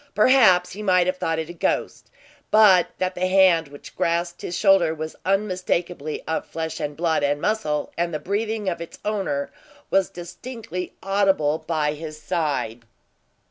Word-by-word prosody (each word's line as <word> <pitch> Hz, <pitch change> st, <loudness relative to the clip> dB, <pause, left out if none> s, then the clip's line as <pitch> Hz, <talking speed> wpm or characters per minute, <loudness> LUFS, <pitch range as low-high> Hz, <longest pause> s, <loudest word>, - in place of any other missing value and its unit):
Perhaps 210 Hz, -6 st, +5 dB
he 205 Hz, -, -7 dB
might 185 Hz, -3 st, +3 dB
have 185 Hz, +1 st, -1 dB
thought 165 Hz, -2 st, -1 dB
it 160 Hz, -1 st, -3 dB
a 175 Hz, -, -8 dB
ghost, 170 Hz, -, -2 dB, 0.4 s
but 205 Hz, -5 st, +6 dB
that 185 Hz, 0 st, -1 dB
the 185 Hz, 0 st, -1 dB
hand 185 Hz, -4 st, +4 dB
which 145 Hz, 0 st, -13 dB
grasped 170 Hz, +1 st, -1 dB
his 175 Hz, -, -4 dB
shoulder 195 Hz, -5 st, +4 dB
was 155 Hz, 0 st, -6 dB
unmistakably 180 Hz, -5 st, -1 dB
of 160 Hz, -, -1 dB
flesh, 160 Hz, -1 st, -4 dB
and 145 Hz, 0 st, -4 dB
blood, 165 Hz, -2 st, +1 dB
and 145 Hz, 0 st, +1 dB
muscle, 155 Hz, -7 st, -1 dB
and 170 Hz, 0 st, 0 dB
the 155 Hz, -, -2 dB
breathing 210 Hz, +6 st, -2 dB
of 170 Hz, -2 st, -2 dB
its 170 Hz, -, -8 dB
owner 195 Hz, -10 st, -2 dB, 0.4 s
was 195 Hz, -1 st, +3 dB
distinctly 180 Hz, +1 st, -7 dB
audible 195 Hz, -6 st, +2 dB
by 155 Hz, -2 st, -1 dB
his 155 Hz, 0 st, -8 dB
side. 150 Hz, -8 st, -2 dB
175 Hz, 160 wpm, -23 LUFS, 155-195 Hz, 0.4 s, but